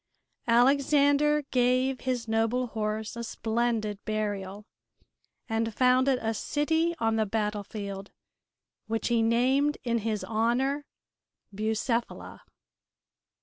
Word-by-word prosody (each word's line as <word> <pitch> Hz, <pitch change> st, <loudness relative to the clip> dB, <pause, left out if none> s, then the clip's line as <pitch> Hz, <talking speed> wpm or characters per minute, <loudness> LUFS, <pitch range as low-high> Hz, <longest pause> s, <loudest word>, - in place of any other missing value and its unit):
Alexander 285 Hz, +4 st, +4 dB
gave 255 Hz, +1 st, +2 dB
his 250 Hz, -3 st, -2 dB
noble 225 Hz, +3 st, +1 dB
horse 220 Hz, -1 st, -3 dB
a 235 Hz, -, -5 dB
splendid 225 Hz, -2 st, -2 dB
burial 205 Hz, -2 st, -3 dB, 0.8 s
and 225 Hz, -1 st, -1 dB
founded 255 Hz, +1 st, +3 dB
a 225 Hz, 0 st, 0 dB
city 320 Hz, +8 st, 0 dB
on 225 Hz, -1 st, +1 dB
the 220 Hz, -, +2 dB
battlefield, 205 Hz, -1 st, -4 dB, 0.8 s
which 225 Hz, +2 st, -1 dB
he 235 Hz, -1 st, +2 dB
named 260 Hz, +6 st, +2 dB
in 235 Hz, -2 st, 0 dB
his 215 Hz, -1 st, -2 dB
honor 250 Hz, +6 st, 0 dB, 0.7 s
Bucephala. 220 Hz, +3 st, -2 dB
230 Hz, 100 wpm, -28 LUFS, 220-260 Hz, 0.8 s, Alexander